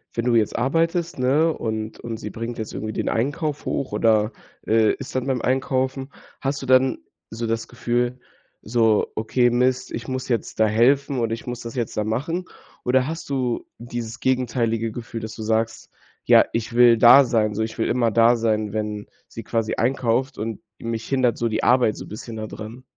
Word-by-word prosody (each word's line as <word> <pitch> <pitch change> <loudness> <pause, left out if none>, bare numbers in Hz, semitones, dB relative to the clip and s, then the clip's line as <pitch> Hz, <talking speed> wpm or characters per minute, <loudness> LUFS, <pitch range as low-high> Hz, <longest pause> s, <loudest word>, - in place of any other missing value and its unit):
wenn 115 - -1
du 120 -1 +3
jetzt 110 -2 +2
arbeitest, 165 +6 0
ne, 145 +6 +3
und 110 -1 -4
und 115 -1 -5
sie 105 - -6
bringt 115 +2 -5
jetzt 110 - -4
irgendwie 110 0 -4
den - - -1
Einkauf 145 +5 -2
hoch 135 - -2
oder, 110 -1 +3 0.4
äh, 110 0 +4
ist 135 - -8
dann 130 -1 0
beim 130 -3 0
Einkaufen. 130 +1 -1 0.3
Hast 140 0 -2
du - - -6
dann 130 0 +4 0.3
so 115 +1 -4
das 115 0 -2
Gefühl, 120 +1 -1 0.4
so: 110 -1 +2
„Okay, 120 +3 +2
Mist, 125 +1 +1
ich 115 0 -5
muss 130 -1 -3
jetzt 115 -3 -2
da 110 - +5
helfen 135 +5 +3
oder 115 -1 0
ich 115 - -7
muss 120 0 -4
das 115 -1 -7
jetzt 120 -4 -3
da 105 - +1
machen?“ 145 - -2 0.4
Oder 130 +1 +2
hast 165 +1 -5
du 125 -3 -1
dieses 120 0 -6
gegenteilige 120 -3 0
Gefühl, 115 0 -6
dass 110 0 -6
du 110 - -8
sagst: 110 +1 -1 0.4
„Ja, - - +6
ich 115 0 -2
will 120 -1 +6
da 130 +4 +9
sein, 110 -3 +1
so, 110 - 0
ich 110 0 -5
will - - +1
immer 120 -2 +1
da 115 +2 +5
sein, 110 -2 0
wenn 105 -1 -3 0.2
sie 115 - -8
quasi 115 -1 -1
einkauft 130 +2 0
und 110 -1 -4 0.2
mich 115 -1 -4
hindert 130 -3 +1
so 120 - +1
die 110 -1 -2
Arbeit 120 -3 +3
so - - -7
bisschen 110 +2 -8
da 110 - -4
dran?“ 110 +5 -9
120 Hz, 195 wpm, -23 LUFS, 110-130 Hz, 0.4 s, da